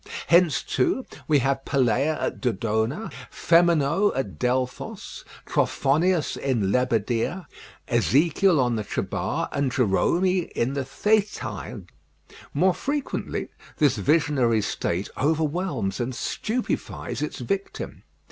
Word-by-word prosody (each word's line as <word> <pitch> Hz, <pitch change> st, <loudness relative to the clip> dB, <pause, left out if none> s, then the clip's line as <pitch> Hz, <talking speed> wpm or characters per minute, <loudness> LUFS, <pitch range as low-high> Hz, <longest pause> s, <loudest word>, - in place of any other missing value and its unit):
Hence, 170 Hz, -5 st, +4 dB
too, 195 Hz, -, 0 dB, 0.2 s
we 150 Hz, -, +4 dB
have 135 Hz, 0 st, 0 dB
Peleia 140 Hz, +4 st, +1 dB
at -, -, -3 dB
Dodona, 115 Hz, -, -1 dB, 0.2 s
Phemonoe 170 Hz, +2 st, +3 dB
at 135 Hz, -, -3 dB
Delphos, 125 Hz, 0 st, -2 dB, 0.2 s
Trophonius 160 Hz, +3 st, +1 dB
in 115 Hz, -8 st, 0 dB
Lebadea, 125 Hz, -, 0 dB, 0.4 s
Ezekiel 150 Hz, -, +3 dB
on 120 Hz, -3 st, +1 dB
the 110 Hz, -, -2 dB
Chebar, -, -, -2 dB
and 140 Hz, -2 st, 0 dB
Jerome 125 Hz, -, +2 dB, 0.3 s
in 125 Hz, +4 st, 0 dB
the 140 Hz, -2 st, -2 dB
Thetais. 210 Hz, +7 st, -1 dB, 0.7 s
More 185 Hz, 0 st, +3 dB
frequently 285 Hz, +5 st, -3 dB, 0.3 s
this 145 Hz, -5 st, +3 dB
visionary 135 Hz, -8 st, +2 dB
state 90 Hz, 0 st, -2 dB
overwhelms 150 Hz, -, 0 dB
and 125 Hz, +1 st, -2 dB
stupefies 235 Hz, -, -3 dB
its -, -, -3 dB
victim. 395 Hz, -1 st, -4 dB
140 Hz, 105 wpm, -25 LUFS, 125-175 Hz, 0.7 s, Hence